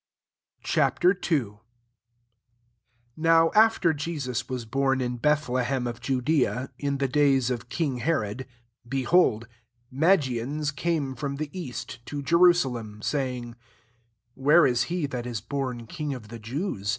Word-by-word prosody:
Ch. - - 0
II. 180 -4 +2
1 105 -1 -14 1.6
NOW 165 0 +4
after 215 -6 +4
Jesus 145 -5 -3
w€» 120 -4 -6
born 135 -1 +1
in 125 -1 -2
Bethlehem 130 -2 0
ofJudea, 130 +2 -1
in 140 -1 -1
the 135 0 0
days 135 -2 +2
of 120 -1 -4
king 140 -2 -1
Herod, 125 -3 -2 0.4
behold. 130 -3 +2 0.4
Ma* 160 +9 +5
gians 140 +1 -2
came 155 -4 -1
from 140 +2 -4
the 150 0 -5
east, 130 -7 -7
to 145 -1 -5
JerU" 170 +4 +6
salem, 115 -9 -3
2 - - -15
saying, 125 -4 -2 0.4
<< 115 0 -44
Where 145 +6 +5
is 120 -3 +2
he 175 -3 -1
that 125 -3 -4
is 120 -3 -3
bom 125 +1 -4
king 150 +1 -4
of 110 -5 -11
the 115 0 -8
Jews? 115 - -4
135 Hz, 140 wpm, -26 LUFS, 120-150 Hz, 1.6 s, JerU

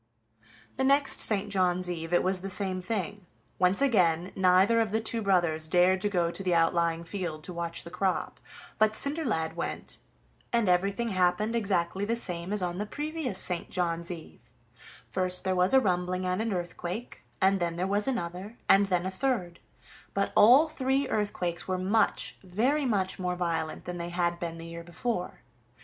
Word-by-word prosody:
The 265 - 0
next 275 +1 +4
St. 205 -1 0
John's 180 -2 +1
eve 165 -2 -4
it 175 - +3
was 185 0 0
the 195 - -5
same 190 -1 -2
thing, 205 -1 -4 0.3
once 185 +7 +3
again: 180 -9 +2
neither 190 +4 +4
of 220 -3 -1
the 220 - +1
two 225 +1 -1
brothers 175 -6 +1
dared 180 +3 +3
to 205 - +1
go 175 -4 +1
to 195 - -4
the 180 -2 +1
outlying 165 0 +2
field 170 -4 -5
to 180 - -5
watch 170 -1 -3
the 170 - -10
crop, 185 0 -1 0.4
but 215 0 +3
Cinderlad 265 - -1
went, - - -5 0.5
and 235 -3 +2
everything 200 +6 +1
happened 195 +4 +1
exactly 195 -4 0
the 225 +3 0
same 180 -5 -4
as 210 -3 0
on 175 +1 -2
the 210 - -3
previous 295 -4 -3
St. 180 -2 0
John's 170 -2 -2
eve: 170 -3 -10 0.6
first 185 -1 -1
there 190 - +1
was 180 +1 +3
a 265 - +7
rumbling 185 -3 -1
and 185 +3 0
an 225 0 -1
earthquake, 180 +4 -5 0.2
and 195 +1 +3
then 170 -1 -1
there 180 +2 -1
was 205 +3 0
another, 200 -2 -4
and 200 +1 +5
then 180 -2 0
a 190 - -2
third: 190 -6 -2 0.6
but 195 0 0
all 255 +9 +7
three 270 -2 0
earthquakes 180 -5 -2
were 185 -1 0
much, 195 +5 +1
very 245 +11 +1
much 195 -5 0
more 180 -1 -1
violent 165 -3 -2
than 180 -1 -5
they 170 0 -4
had 175 0 -1
been 170 -2 -4
the 165 - -8
year 170 0 -8
before. 180 +3 -4
185 Hz, 180 wpm, -28 LUFS, 175-210 Hz, 0.6 s, a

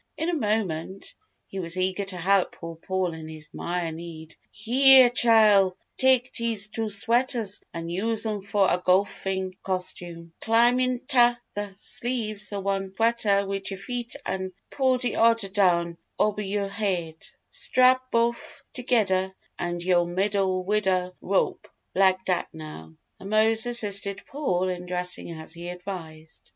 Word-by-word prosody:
In 320 - -1
a - - -1
moment, 200 - -2 0.3
he 195 - -7
was 170 0 -1
eager 185 +2 0
to 190 -2 -6
help 190 +2 +2
poor 165 -1 -8
Paul 185 +1 -2
in 160 -1 -8
his 155 -1 -8
"mire" 175 -1 -3
need. 160 -1 -9
"Heah, 255 +3 +6
Chile, 215 -6 +5 0.2
tak' 260 -1 +3
dese 225 -3 -1
two 220 0 -3
sweaters 230 0 0
an' 165 -1 -6
use 220 +6 -1
'em 210 -2 -2
fo' 200 +1 +1
a 180 -1 +1
go'fing 190 0 0
costume. 175 -3 -4
Clim' 235 +2 +4
inta 255 -1 +3 0.2
th' 205 -1 -5
sleeves 215 -4 -3
ov 200 -1 -4
one 195 -1 -2
sweater 215 -3 +2
wid 195 -1 -3
yur 195 - -5
feet 240 +5 -4
an' 190 0 -3 0.2
pull 260 -2 +2
de' 250 -1 -2
odder 230 -3 +3
down 170 -4 +1 0.2
obber 210 0 +1
yo' 200 0 -2
haid. 185 -6 -3 0.3
Strap 255 0 +3
bof' 235 0 -1
togedder 195 -7 +1 0.2
about 175 0 -3
yo' 175 -1 +3
middle 190 +1 0
wid'da 190 -3 +1
rope 195 0 0 0.3
lik' 190 0 +3
dat, 180 -2 0
now!" 155 - -10 0.2
And 195 - -8
Mose 220 +2 +3
assisted 200 -4 -1
Paul 185 -11 -1
in 180 -1 -4
dressing 180 0 -2
as 160 -1 -8
he 170 +1 -7
advised. 175 -4 -9
195 Hz, 145 wpm, -25 LUFS, 180-225 Hz, 0.3 s, Heah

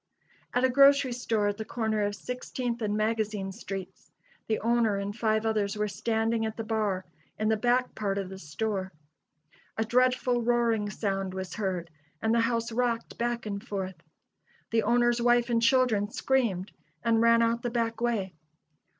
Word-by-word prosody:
At 245 - +2
a 260 - +5
grocery 275 0 +5
store 225 -4 0
at 205 - -3
the 220 - -3
corner 220 -1 -1
of 205 0 0
Sixteenth 245 +1 -4
and 210 -1 0
Magazine 215 -2 -1
streets 190 0 -7 0.4
the 220 - +1
owner 230 -2 +2
and 200 +1 -4
five 220 -1 +1
others 210 -1 0
were 210 0 0
standing 225 +2 0
at 220 0 -3
the 225 - -3
bar 210 -4 -1 0.3
in 215 0 0
the 220 - +3
back 245 +3 +1
part 200 -2 -2
of 195 -2 -2
the 190 0 -9
store. 190 +4 -3 0.9
A 220 - +1
dreadful 250 +1 +2
roaring 230 -3 +1
sound 195 -3 -2
was 190 -1 -5
heard, 185 -5 -3 0.3
and 220 0 +1
the 235 - +3
house 230 0 0
rocked 235 0 -1
back 235 0 -1
and 200 -1 -4
forth. 190 -6 -5 0.7
The 225 0 +3
owner's 240 +2 +2
wife 240 0 +3
and 230 -1 +2
children 230 -4 +3
screamed 220 -7 0 0.3
and 230 -1 +3
ran 230 0 +5
out 230 0 +1
the 240 - -2
back 230 -1 -1
way. 215 -6 0
225 Hz, 170 wpm, -28 LUFS, 205-240 Hz, 0.9 s, a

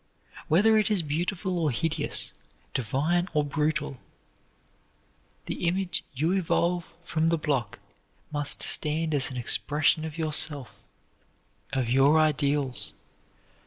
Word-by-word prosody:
Whether 215 +7 +4
it 210 - +1
is 200 -5 +1
beautiful 175 +4 -2
or 160 -3 +1
hideous, 160 +5 0 0.4
divine 150 - 0
or 150 -1 +2
brutal, 150 -2 -1 1.5
the 175 - -3
image 180 0 0
you 155 +6 +1
evolve 175 -2 0
from 165 -1 0
the 165 - +2
block 145 -7 -2 0.5
must 145 -1 0
stand 155 +1 +1
as 140 -3 +3
an 130 - -7
expression 150 +6 +2
of 160 0 -6
yourself, 150 -4 -1 0.9
of 130 -3 -1
your 135 +5 +4
ideals. 145 -3 +1
155 Hz, 115 wpm, -27 LUFS, 145-170 Hz, 1.5 s, Whether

